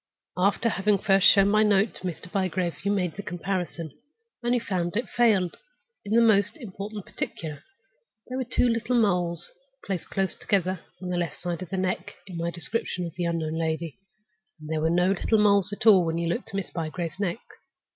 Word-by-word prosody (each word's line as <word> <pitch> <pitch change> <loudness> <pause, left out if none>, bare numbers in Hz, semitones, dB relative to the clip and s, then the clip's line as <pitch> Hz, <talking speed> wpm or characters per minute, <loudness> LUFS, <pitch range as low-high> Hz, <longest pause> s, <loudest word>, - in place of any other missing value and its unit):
—after 200 +5 +2
having 210 -1 +2
first 195 0 +4
shown 195 -1 +7
my 215 +1 +4
note 210 0 +3
to 185 - -5
Mr. 175 +1 -6
Bygrave, 185 -3 -1
you 200 - +1
made 180 -5 0
the 200 - -5
comparison, 175 -3 -3 0.5
and 240 +1 +1
you - - +2
found 185 -4 -2
it 235 0 -1
fail 210 -7 +3 0.5
in 205 0 -3
the 235 - +6
most 210 - +3
important 205 -4 -7
particular. 155 -3 -5 0.6
There 255 +1 -4
were - - 0
two 245 - +2
little 230 +1 +1
moles 175 -5 0 0.3
placed 190 -4 -3
close 195 -1 0
together 185 -2 0 0.2
on 180 - -4
the 180 - -1
left 170 -4 -2
side 175 0 -3
of 185 - -6
the 190 - -3
neck, 185 -1 -2
in 185 -3 -9
my 170 0 -1
description 175 +2 -3
of 165 - -6
the 175 0 -2
unknown 165 -2 -1
lady, 160 0 -2 0.6
and 155 0 -10
there 155 -1 0
were 160 - +2
no 180 +2 +3
little 210 +3 +2
moles 200 -2 +4
at 205 - -5
all 200 -5 +8
when 165 0 -1
you 170 0 -1
looked 205 +9 -2
at 200 - -8
Miss 195 -2 -3
Bygrave's 165 +2 -4
neck. 200 +2 -1
185 Hz, 200 wpm, -26 LUFS, 170-205 Hz, 0.6 s, all